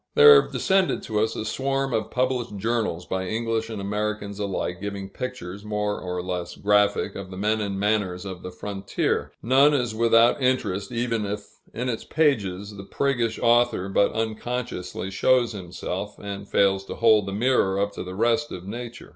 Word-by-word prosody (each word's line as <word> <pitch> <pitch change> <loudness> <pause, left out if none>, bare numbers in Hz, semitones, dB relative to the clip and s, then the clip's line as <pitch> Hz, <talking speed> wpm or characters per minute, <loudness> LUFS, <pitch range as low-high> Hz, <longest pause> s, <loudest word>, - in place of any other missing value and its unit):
There 445 -1 +9
have - - -10
descended 190 -1 +1
to 105 -2 -1
us 110 +1 0
a 110 - -4
swarm 135 +3 -1
of 110 -1 -1
published 125 -4 -1
journals 105 -5 -1
by 95 0 -3
English 115 +1 -1
and 110 -2 -5
Americans 105 0 -3
alike, 95 -3 -3
giving 100 -1 -5
pictures, 105 -7 -6
more 105 -1 -2
or 90 -1 -3
less 90 -1 -4
graphic, 105 0 +2
of 100 -1 -7
the 95 - -8
men 105 +2 +1
and 100 -2 -3
manners 100 -3 0
of 95 -2 -6
the - - -6
frontier; 100 +1 -2
none 135 +5 +5
is 120 -5 0
without 115 +4 +4
interest, 105 -6 0
even 115 -3 -1
if 105 0 -5 0.2
in 125 +3 -3
its 115 -3 -2
pages 105 - 0
the 100 - -8
priggish 120 0 0
author 120 -5 +3
but 100 +1 +3
unconsciously 110 -4 -3
shows 120 +4 +3
himself, 95 +1 -5
and 100 0 -7
fails 95 -1 +3
to - - -6
hold 110 -3 +4
the - - -3
mirror 100 -3 +2
up 100 +1 0
to - - -6
the 90 0 -7
rest 120 +7 +1
of 90 0 -7
nature. 120 +3 -7
105 Hz, 180 wpm, -25 LUFS, 100-120 Hz, 0.2 s, There